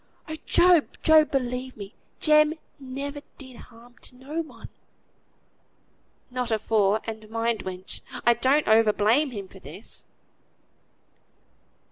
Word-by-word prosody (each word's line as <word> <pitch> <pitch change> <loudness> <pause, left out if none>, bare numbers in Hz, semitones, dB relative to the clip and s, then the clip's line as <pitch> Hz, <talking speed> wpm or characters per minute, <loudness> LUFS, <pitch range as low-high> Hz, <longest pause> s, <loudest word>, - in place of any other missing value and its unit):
Oh! 315 - -5
Job, 350 -3 +5 0.2
Job; 315 -1 +6
believe 255 -1 -3
me, 200 +1 -9 0.3
Jem 305 0 +4 0.2
never 280 +2 -6 0.2
did 260 -3 -10
harm 240 +1 -16
to - - -10
no 285 +6 -4
one." 315 - -11 1.6
"Not 250 -1 -2
afore; 215 -1 +2
and 220 -1 -7
mind, 225 0 -1
wench! 185 0 -7 0.2
I 240 - +6
don't 265 +6 +2
over 220 -1 +5
blame 235 +10 +2
him 200 -6 -7
for - - -15
this." - - -9
250 Hz, 120 wpm, -25 LUFS, 220-285 Hz, 1.6 s, Job